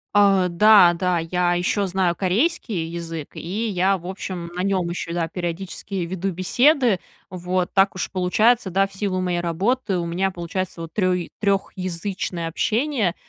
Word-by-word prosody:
А, 195 Hz, -2 st, +5 dB
да, 180 Hz, 0 st, +6 dB
да, 180 Hz, 0 st, 0 dB
я 175 Hz, +1 st, 0 dB
еще 190 Hz, +3 st, 0 dB
знаю 180 Hz, -2 st, +1 dB
корейский 205 Hz, -, 0 dB
язык, 165 Hz, -2 st, -6 dB
и 205 Hz, +7 st, -3 dB
я, 190 Hz, -1 st, +1 dB
в 175 Hz, -, -14 dB
общем, 180 Hz, -2 st, -5 dB
на 180 Hz, -, -2 dB
нем 190 Hz, -2 st, 0 dB
еще, 170 Hz, -1 st, -4 dB
да, 170 Hz, -1 st, -1 dB
периодически 175 Hz, +3 st, -5 dB
веду 190 Hz, +2 st, -3 dB
беседы, 240 Hz, -, +3 dB, 0.3 s
вот. 180 Hz, 0 st, -2 dB
Так 195 Hz, 0 st, +3 dB
уж 190 Hz, -, -4 dB
получается, 205 Hz, +4 st, +2 dB
да, 195 Hz, +2 st, +2 dB
в 195 Hz, -, -12 dB
силу 190 Hz, -2 st, -2 dB
моей 180 Hz, -1 st, -1 dB
работы 190 Hz, +5 st, 0 dB
у 170 Hz, -, -2 dB
меня 180 Hz, +3 st, 0 dB
получается 175 Hz, -1 st, -4 dB
вот 165 Hz, -1 st, -8 dB
трё 185 Hz, -3 st, +2 dB, 0.2 s
трехязычное 185 Hz, -3 st, -2 dB
общение 220 Hz, -, 0 dB
185 Hz, 160 wpm, -22 LUFS, 175-195 Hz, 0.3 s, да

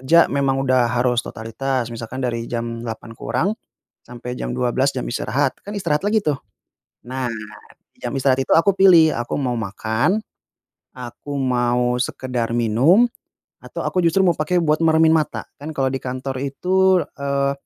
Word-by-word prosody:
Kerja 165 Hz, +6 st, +5 dB
memang 135 Hz, -1 st, 0 dB
udah 125 Hz, -2 st, +3 dB
harus 125 Hz, 0 st, +2 dB
totalitas, 120 Hz, +2 st, -3 dB
misalkan 115 Hz, +3 st, -6 dB
dari 115 Hz, -2 st, -2 dB
jam 115 Hz, -1 st, -3 dB
8 115 Hz, 0 st, -7 dB
kurang 185 Hz, -, -1 dB, 0.6 s
sampai 125 Hz, +1 st, -7 dB
jam -, -, -4 dB
12 130 Hz, +2 st, +1 dB
jam -, -, -2 dB
istirahat, -, -, -1 dB
kan 205 Hz, -, -7 dB
istirahat 150 Hz, -5 st, 0 dB
lagi 215 Hz, +1 st, +2 dB
tuh. 150 Hz, -2 st, +1 dB, 0.7 s
Nah, 130 Hz, +1 st, -3 dB, 0.7 s
jam -, -, -3 dB
istirahat 135 Hz, 0 st, +2 dB
itu -, -, +1 dB
aku 165 Hz, +5 st, +5 dB
pilih, 170 Hz, -5 st, +6 dB
aku 120 Hz, 0 st, -3 dB
mau 130 Hz, -3 st, -1 dB
makan, 110 Hz, -, 0 dB, 0.8 s
aku 125 Hz, +3 st, -7 dB
mau 125 Hz, -1 st, +1 dB
sekedar 125 Hz, -4 st, -3 dB
minum, 130 Hz, -, +4 dB, 0.6 s
atau -, -, -6 dB
aku 185 Hz, -, 0 dB
justru 170 Hz, +3 st, +3 dB
mau 175 Hz, -, +5 dB
pakai 155 Hz, +4 st, -1 dB
buat 155 Hz, -1 st, +2 dB
meremin 160 Hz, 0 st, +5 dB
mata. 155 Hz, -2 st, -1 dB, 0.2 s
Kan 155 Hz, +2 st, -6 dB
kalau 135 Hz, -1 st, +1 dB
di 135 Hz, -, -2 dB
kantor 130 Hz, +1 st, -4 dB
itu, 185 Hz, +6 st, +2 dB, 0.2 s
eee, 140 Hz, 0 st, 0 dB
130 Hz, 155 wpm, -21 LUFS, 120-155 Hz, 0.8 s, pilih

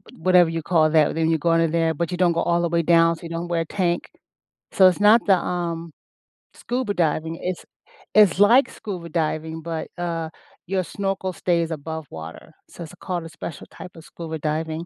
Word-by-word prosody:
whatever 180 Hz, 0 st, +4 dB
you 165 Hz, 0 st, -3 dB
call 155 Hz, -2 st, +2 dB
that 155 Hz, -1 st, +3 dB
when 160 Hz, 0 st, +1 dB
you 160 Hz, -, +1 dB
go 170 Hz, -, 0 dB
under 165 Hz, 0 st, +3 dB
there, 165 Hz, 0 st, +1 dB
but 170 Hz, +3 st, -2 dB
you 180 Hz, -, -3 dB
don't 175 Hz, -1 st, +3 dB
go 170 Hz, -, 0 dB
all 170 Hz, 0 st, +1 dB
the 170 Hz, -, 0 dB
way 170 Hz, 0 st, +1 dB
down, 165 Hz, 0 st, +4 dB
so 160 Hz, -, -16 dB
you 165 Hz, -, -7 dB
don't 170 Hz, +1 st, -4 dB
wear 170 Hz, -1 st, 0 dB
a 165 Hz, -, -3 dB
tank, 175 Hz, 0 st, -2 dB, 0.6 s
so 190 Hz, -, +5 dB
it's 185 Hz, +1 st, +3 dB
not 215 Hz, +3 st, +5 dB
the, 195 Hz, -3 st, +5 dB
um, 170 Hz, -2 st, -4 dB, 0.6 s
scuba 245 Hz, -4 st, -3 dB
diving. 160 Hz, -1 st, -1 dB
It's 180 Hz, -1 st, -4 dB, 0.5 s
it's 210 Hz, -5 st, +5 dB
like 235 Hz, +7 st, +5 dB
scuba 185 Hz, -6 st, -7 dB
diving, 160 Hz, 0 st, -2 dB
but, 165 Hz, 0 st, -5 dB
uh, 165 Hz, -2 st, -3 dB, 0.4 s
your 190 Hz, +1 st, 0 dB
snorkel 195 Hz, 0 st, -3 dB
stays 170 Hz, -2 st, 0 dB
above 160 Hz, +1 st, -5 dB
water, 80 Hz, -, -10 dB, 0.2 s
so 170 Hz, -, -9 dB
it's 160 Hz, -, -11 dB
called 175 Hz, -2 st, -4 dB
a 165 Hz, -, -9 dB
special 160 Hz, -, -8 dB
type 180 Hz, -, -10 dB
of 165 Hz, -, -12 dB
scuba 160 Hz, -2 st, -7 dB
diving. 160 Hz, +2 st, -3 dB
170 Hz, 205 wpm, -23 LUFS, 160-180 Hz, 0.6 s, so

